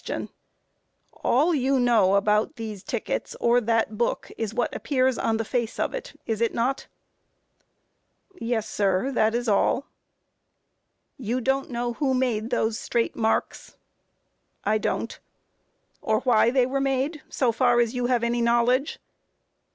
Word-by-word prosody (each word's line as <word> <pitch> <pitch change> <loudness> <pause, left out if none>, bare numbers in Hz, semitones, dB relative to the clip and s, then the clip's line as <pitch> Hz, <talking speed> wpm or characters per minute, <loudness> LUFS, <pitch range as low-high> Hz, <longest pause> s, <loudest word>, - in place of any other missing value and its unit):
All 300 +8 +3
you 270 -2 +2
know 220 -6 +4
about 210 +7 +2
these 220 -5 -6
tickets 245 -7 -3
or 240 +1 +3
that 225 -2 0
book, 240 - -1
is 220 -2 -3
what 240 +2 -1
appears 260 -2 +1
on 225 - +1
the 225 - -2
face 235 -1 -2
of - - -1
it, - - -7
is 225 -1 -2
it 230 - +1
not? 255 +4 -1 1.5
A. - - -26
Yes, 230 -2 -1
sir; 200 +4 0
that 220 -3 +2
is 240 0 -2
all. 215 +4 +2
Q. 280 - -34 1.4
You 245 +3 0
don't 270 +2 0
know 240 -1 -2
who 265 +1 0
made 235 -4 0
those 225 -3 0
straight 235 -1 -1
marks? 220 -1 -1 0.9
A. - - -1
I 215 - +3
don't. - - -1
Q. - - -12 0.8
Or 215 0 +1
why 235 -3 +4
they 255 0 +3
were 270 +2 -1
made, 275 +3 -1
so 250 -4 +1
far 240 +1 +3
as 235 0 +1
you 245 -1 -1
have 245 -2 +1
any 235 0 0
knowledge? 240 +5 +2
240 Hz, 155 wpm, -25 LUFS, 220-260 Hz, 1.5 s, know